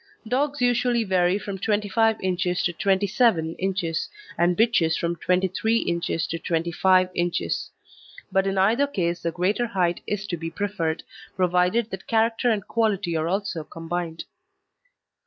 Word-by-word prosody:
Dogs 280 +3 0
usually 245 -1 +2
vary 185 -2 +2
from 200 -2 -6
25 215 +2 +1
inches 180 -1 0
to 175 - 0
27 195 -2 +2
inches 180 -4 -1 0.3
and 175 +1 +2
bitches 215 -8 +3
from 170 0 -1
23 190 +6 +1
inches 170 -5 -1
to 165 - -4
25 180 +3 +2
inches; 175 0 -1 0.6
but 195 0 +2
in 195 0 -1
either 225 +9 +3
case 175 -10 -2
the 170 - -1
greater 195 +8 0
height 180 -5 0
is 210 0 -2
to 175 -3 -3
be 165 0 -4
preferred, 165 -3 -2 0.3
provided 180 +5 +2
that 190 0 -7
character 230 +2 +2
and 210 -3 -1
quality 205 -7 0
are 160 0 0
also 190 -3 -2
combined. 165 +1 -5
190 Hz, 140 wpm, -24 LUFS, 170-215 Hz, 0.6 s, bitches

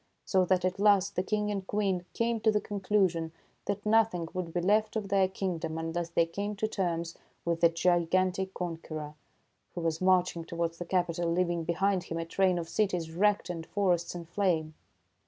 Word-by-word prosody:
So 185 -2 +3
that 185 0 +2
at 185 +1 -1
last 200 -2 +4
the - - +2
King 210 +2 -1
and 195 -2 -4
Queen 195 -4 0
came 230 0 0
to 220 - +3
the 210 - +2
conclusion 190 -5 0 0.3
that 205 +1 -3
nothing 210 -6 +3
would 180 -2 -3
be 175 - -1
left 215 +5 +2
of 210 -3 -2
their 195 -1 +4
king 185 -2 -3
dom 160 -1 -4
unless 165 +1 -3
they 170 0 +2
came 200 +5 -4
to 215 +2 -1
terms 170 -5 -2 0.3
with 170 -1 -1
the 170 - +7
gigantic 180 +2 +1
conqueror, 160 -3 -5 0.6
who 175 - -3
was 165 0 -1
marching 180 -2 +2
towards 170 0 -3
the 175 - -4
capital, 175 -1 0
leaving 170 -1 0
behind 185 +2 +1
him 165 - -4
a 165 - -2
train 185 +1 +2
of 170 -1 -3
cities 180 -5 -1
wrecked 205 +4 +2
and 165 -2 -5
forests 180 -4 0
in 170 -1 -6
flame. 165 -3 0
180 Hz, 190 wpm, -30 LUFS, 170-200 Hz, 0.6 s, the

